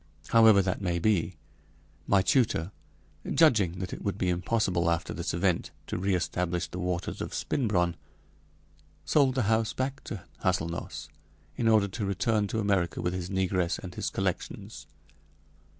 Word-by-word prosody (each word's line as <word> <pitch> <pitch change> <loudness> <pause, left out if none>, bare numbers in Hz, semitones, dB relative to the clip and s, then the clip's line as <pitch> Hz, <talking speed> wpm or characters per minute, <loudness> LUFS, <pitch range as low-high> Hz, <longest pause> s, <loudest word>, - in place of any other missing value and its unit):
However 110 -4 +6
that 95 +1 -2
may 90 -3 0
be, 90 -1 +1 0.7
my 100 -2 +4
tutor, 105 - +2 0.6
judging 110 - +4
that 95 0 -5
it - - -7
would 100 -1 -2
be 95 -3 0
impossible 90 -1 +1
after 85 -1 -1
this - - -3
event 90 0 0 0.2
to - - -4
reestablish 90 -2 0
the 90 - -6
waters 90 -1 -3
of - - -4
Spinbronn, 90 -9 0 1.1
sold 135 -4 +3
the 130 - +1
house 110 +1 +1
back 135 +2 -3
to 105 -6 -6 0.2
Hâselnoss, 85 -3 -2 0.5
in 115 - 0
order 110 -3 +5
to 105 +3 -4
return 105 +2 +1
to 110 - -3
America 100 -6 0
with 90 - -1
his 90 -1 -4
negress 95 -2 0
and 90 -2 -8 0.2
collections. - - -4
95 Hz, 145 wpm, -28 LUFS, 90-110 Hz, 1.1 s, However